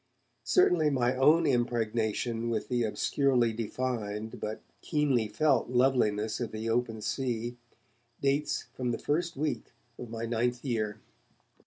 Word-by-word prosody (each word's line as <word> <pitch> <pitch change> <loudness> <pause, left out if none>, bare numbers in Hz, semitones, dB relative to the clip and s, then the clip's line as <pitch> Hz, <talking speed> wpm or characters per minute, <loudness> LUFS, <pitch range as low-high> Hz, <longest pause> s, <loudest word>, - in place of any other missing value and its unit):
Certainly 175 - +4
my 125 -2 +1
own 155 +6 +5
impregnation 115 -1 0
with 110 -2 -2
the 125 -1 +1
obscurely 120 +1 +2
defined 110 -2 -3
but 110 +1 -5 0.2
keenly 140 -8 +1
felt 135 +1 +2
loveliness 120 -4 +2
of 120 -3 -3
the 110 +1 -4
open 115 -2 -1
sea 120 +1 -2 0.6
dates 140 +2 0
from 125 -1 -2
the 120 - -1
first 170 +2 -1
week 150 +2 -2 0.3
of 120 - -7
my 115 0 -4
ninth 120 +2 -1
year. 110 -4 -1
120 Hz, 130 wpm, -30 LUFS, 110-135 Hz, 0.6 s, own